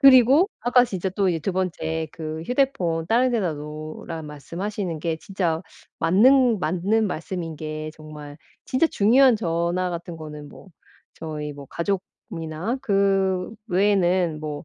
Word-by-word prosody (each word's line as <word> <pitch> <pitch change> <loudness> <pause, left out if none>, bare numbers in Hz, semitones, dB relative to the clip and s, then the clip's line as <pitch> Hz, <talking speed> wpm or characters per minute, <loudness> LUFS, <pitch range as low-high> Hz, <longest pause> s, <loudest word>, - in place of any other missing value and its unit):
그리고 275 - +7
아까 245 +1 +4
진짜 190 -4 -3
또 195 -1 +1
예 165 - -1
2 190 +5 -2
번째 160 -3 -2
그 160 -1 -5
휴대폰 190 -12 0
다른 250 +4 +3
데다 200 -8 0
놓으란 155 +1 -7
말씀하시는 170 +4 -4
게 165 0 -1
진짜 170 -2 -2 0.4
맞는 230 +7 +5
맞는 195 +6 +1
말씀인 170 -1 -4
게 155 0 -5
정말 150 -2 -10 0.3
진짜 265 +6 +2
중요한 245 +3 +5
전화 175 -1 -1
같은 170 0 -6
거는 150 -2 -9
뭐 - - -14 0.5
저희 150 -2 -5
뭐 140 -1 -10
가족이나 180 - -4
그 195 -4 +1 0.2
외에는 180 -4 +2
뭐 150 0 -5
180 Hz, 260 characters per minute, -24 LUFS, 160-205 Hz, 0.5 s, 그리고